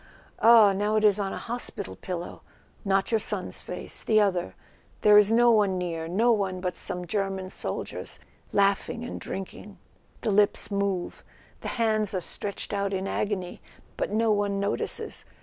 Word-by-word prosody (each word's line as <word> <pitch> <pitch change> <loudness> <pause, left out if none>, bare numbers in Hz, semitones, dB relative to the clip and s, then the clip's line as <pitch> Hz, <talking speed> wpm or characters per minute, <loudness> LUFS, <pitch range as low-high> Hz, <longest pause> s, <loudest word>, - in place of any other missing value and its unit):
Ah, 225 -3 +7
now 205 +2 0
it 215 - +2
is 210 -1 +5
on 195 -1 -1
a - - -4
hospital 230 -4 -5
pillow—not 195 +2 -4
your 225 - +3
son's 215 - -2
face, - - -5
the 215 -1 +3
other; 185 - 0 0.5
there 210 -1 +6
is 210 0 +7
no 240 +1 +5
one 205 -4 +3
near, 165 -3 -3
no 220 +8 +3
one 195 -4 0
but 180 -1 -3
some 180 0 -4
German 195 0 -2
soldiers - - -4 0.3
laughing 200 +3 +1
and 245 - -6
drinking; 195 +1 -7 0.4
the 215 - 0
lips 205 +1 +2
move, 200 -3 -2 0.4
the - - -6
hands 215 -3 +1
are - - +1
stretched 200 +4 -5
out 200 -1 -1
in 190 +1 -2
agony; 195 -4 -3 0.3
but - - -2
no 220 +2 +2
one 205 -1 +1
notices. 200 +1 -2
200 Hz, 160 wpm, -27 LUFS, 190-215 Hz, 0.5 s, Ah